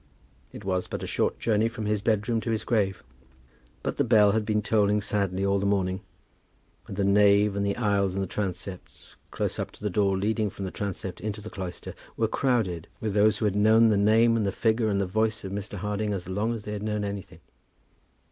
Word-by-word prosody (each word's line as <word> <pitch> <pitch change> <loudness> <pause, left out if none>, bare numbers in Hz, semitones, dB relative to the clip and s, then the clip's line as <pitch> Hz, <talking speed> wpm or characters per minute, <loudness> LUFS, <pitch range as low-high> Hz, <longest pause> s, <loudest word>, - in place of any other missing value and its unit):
It 105 - -10
was 95 -1 -1
but - - -5
a - - -2
short - - 0
journey 110 -1 +2
from 115 -2 -6
his 105 -1 0
bedroom 110 +1 +1
to 115 - -4
his 110 -1 -1
grave. 100 -5 0 0.8
But - - -2
the - - +3
bell 105 -4 +5
had 105 0 -1
been 105 -1 +1
tolling 105 -1 +2
sadly 100 -2 -1
all 100 0 +2
the 100 - -2
morning, 95 -1 0 0.9
and 95 - -7
the 100 - +1
nave 100 +1 +4
and 100 - 0
the 100 0 -1
aisles 100 -4 +1
and 100 - 0
the - - -4
transepts, 95 -1 -6
close - - -3
up - - -2
to - - -15
the 105 - -1
door 100 0 +2
leading 105 +2 0
from 95 0 -6
the 95 - -4
transept 95 -2 -5
into 105 0 -4
the 110 +1 -9
cloister, 90 -2 -6 0.2
were 115 - +2
crowded 110 - 0
with 110 -2 -2
those 105 +1 +4
who 110 - -1
had 100 -2 +1
known 110 +2 +5
the 105 - +3
name 110 +3 +4
and 115 - +1
the - - +1
figure 110 +1 +1
and 100 -1 +1
the 100 - +1
voice 110 +3 0
of 95 - -5
Mr. 105 +1 -5
Harding 105 +2 -2
as 90 -3 -5
long 105 +5 -1
as 110 - -7
they 105 - -5
had 105 - -4
known 105 -1 -2
anything. 100 -5 -6
105 Hz, 225 wpm, -27 LUFS, 100-110 Hz, 0.9 s, bell